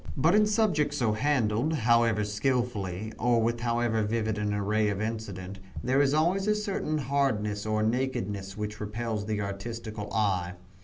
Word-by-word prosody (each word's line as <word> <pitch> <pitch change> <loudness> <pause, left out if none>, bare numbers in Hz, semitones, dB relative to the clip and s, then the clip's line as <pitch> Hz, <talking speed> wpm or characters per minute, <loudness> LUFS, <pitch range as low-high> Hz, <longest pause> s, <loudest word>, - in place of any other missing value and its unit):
But 160 +6 +4
in 210 0 +5
subjects 190 -9 +1
so 115 -4 +2
handled, 125 +2 +1
however 115 -5 +3
skillfully, 105 -2 -1
or 120 0 +3
with 115 +1 0
however 120 -1 +1
vivid 110 0 -1
an 105 0 0
array 105 +1 +1
of 100 -2 -2
incident, 100 -4 -4 0.2
there 130 +3 +3
is 140 +1 +3
always 180 +6 +2
a 210 - +3
certain 200 -7 -1
hardness 115 -8 0
or 110 0 +1
nakedness 105 -5 -2
which 105 0 -4
repels 105 0 -3
the 105 -1 -1
artistical 105 +1 -5
eye. 95 -4 0
110 Hz, 155 wpm, -28 LUFS, 105-130 Hz, 0.2 s, in